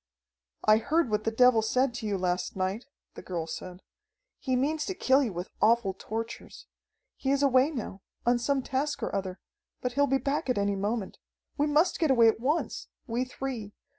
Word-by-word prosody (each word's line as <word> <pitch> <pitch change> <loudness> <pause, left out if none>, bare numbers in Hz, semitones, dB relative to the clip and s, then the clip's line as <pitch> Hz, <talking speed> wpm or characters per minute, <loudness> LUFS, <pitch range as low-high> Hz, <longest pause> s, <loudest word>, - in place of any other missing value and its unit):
"I 215 0 +6
heard 300 +3 +1
what 210 0 0
that 225 0 -2
devil 250 -3 +6
said 250 +3 +1
to 235 -2 -5
you 200 -2 0
last 180 -1 -1
night," 190 +6 -2 0.3
the - - -9
girl 170 -3 -4
said. 180 +3 -8 0.6
"He 260 -2 -1
means 300 +4 0
to 380 - -3
kill 265 -3 +3
you 245 -6 -1
with 175 +1 -6
awful 225 -3 +3
tortures. 225 +4 -6 0.5
He 265 - -2
is 280 +1 +2
away 265 +1 +4
now, 230 -9 -6 0.2
on 240 0 +3
some 270 +2 0
task 285 +3 -2
or - - -3
other, 190 -1 -3 0.4
but 250 - -2
he'll 285 +1 +3
be 270 0 +2
back 275 0 -2
at 250 - +1
any 200 0 +1
moment. 205 +1 -3 0.4
We 295 0 +1
must 310 +5 +2
get 320 - +2
away 235 -4 +6
at 220 - -1
once 295 +8 -1 0.2
we 240 +2 -1
three. 250 -5 -5
240 Hz, 195 wpm, -28 LUFS, 205-270 Hz, 0.6 s, I